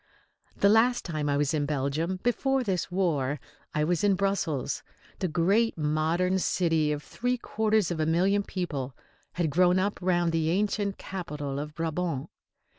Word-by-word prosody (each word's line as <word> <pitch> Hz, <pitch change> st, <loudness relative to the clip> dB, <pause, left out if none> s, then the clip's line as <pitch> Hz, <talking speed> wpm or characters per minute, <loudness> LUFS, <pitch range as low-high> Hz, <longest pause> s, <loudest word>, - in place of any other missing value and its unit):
The 200 Hz, -, +4 dB
last 235 Hz, +4 st, +4 dB
time 155 Hz, -4 st, -2 dB
I 140 Hz, -, +2 dB
was 145 Hz, +1 st, +1 dB
in 145 Hz, -2 st, 0 dB
Belgium, 150 Hz, +6 st, -1 dB
before 265 Hz, +2 st, +1 dB
this 185 Hz, -7 st, -1 dB
war, 150 Hz, -7 st, 0 dB, 0.4 s
I 150 Hz, -, +2 dB
was 175 Hz, +3 st, 0 dB
in 200 Hz, -2 st, +4 dB
Brussels. 185 Hz, -8 st, -1 dB, 0.4 s
The 185 Hz, -, 0 dB
great 190 Hz, +8 st, +2 dB
modern 160 Hz, +5 st, +1 dB
city 165 Hz, -5 st, +1 dB
of 150 Hz, 0 st, -3 dB
three 250 Hz, +1 st, -2 dB
quarters 220 Hz, -5 st, +1 dB
of 165 Hz, -, -3 dB
a 155 Hz, -, +1 dB
million 190 Hz, +5 st, +3 dB
people 145 Hz, -10 st, -4 dB, 0.4 s
had 170 Hz, -4 st, 0 dB
grown 180 Hz, +3 st, +4 dB
up 200 Hz, +2 st, 0 dB
round 175 Hz, -2 st, +2 dB
the 160 Hz, -1 st, +1 dB
ancient 200 Hz, +2 st, 0 dB
capital 150 Hz, -7 st, -5 dB
of 150 Hz, +1 st, -6 dB
Brabant. 165 Hz, -3 st, -2 dB
175 Hz, 160 wpm, -28 LUFS, 150-195 Hz, 0.4 s, The